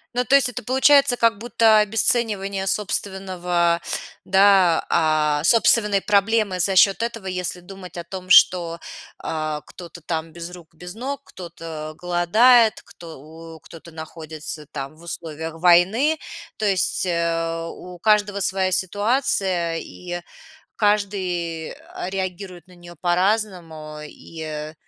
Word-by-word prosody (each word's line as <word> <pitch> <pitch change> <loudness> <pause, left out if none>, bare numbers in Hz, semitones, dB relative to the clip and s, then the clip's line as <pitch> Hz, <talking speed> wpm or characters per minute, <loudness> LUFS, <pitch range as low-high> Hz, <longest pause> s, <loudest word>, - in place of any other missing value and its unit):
Ну, 250 - 0
то 270 - +4
есть 275 -2 +4
это 245 - -7
получается 265 +2 +4
как 230 -2 +2
будто 225 -1 +3
обесценивание 210 -2 +2
собственного, 185 -3 -1 0.5
да, 190 -3 +4
а, 155 -2 +1
собственной 210 -1 +4
проблемы 205 -1 +1
за 190 +2 +2
счёт 195 +2 +5
этого, 230 -4 -5
если 180 -1 -3
думать 185 0 -12
о 170 - -5
том, 185 +1 -9
что, 170 -3 +5 0.4
а, 155 -1 -4
кто-то 175 +3 -12
там 160 0 -4
без 170 0 -8
рук, 175 -2 -14
без 180 +3 -10
ног, 275 +4 -5
кто-то 165 -3 -9
голодает, 215 +7 +3
кто 165 -5 -13
у 160 +1 -12
кто-то 165 +2 -14
находится 160 -1 -8
там 135 +2 -6
в 160 - -18
условиях 160 -1 -6
войны, 195 - +4 0.4
то 215 - -2
есть, 190 -1 0
э, 165 -1 -1
у 180 -1 -11
каждого 205 -1 +2
своя 190 -1 0
ситуация, 190 -4 0
и 175 +1 -7 0.5
каждый, 185 -6 -1
а, 180 - -8
реагирует 185 -2 -6
на 180 - -17
неё 175 0 -14
по-разному, 175 -5 -1
и 155 -1 -8
180 Hz, 130 wpm, -22 LUFS, 165-205 Hz, 0.5 s, счёт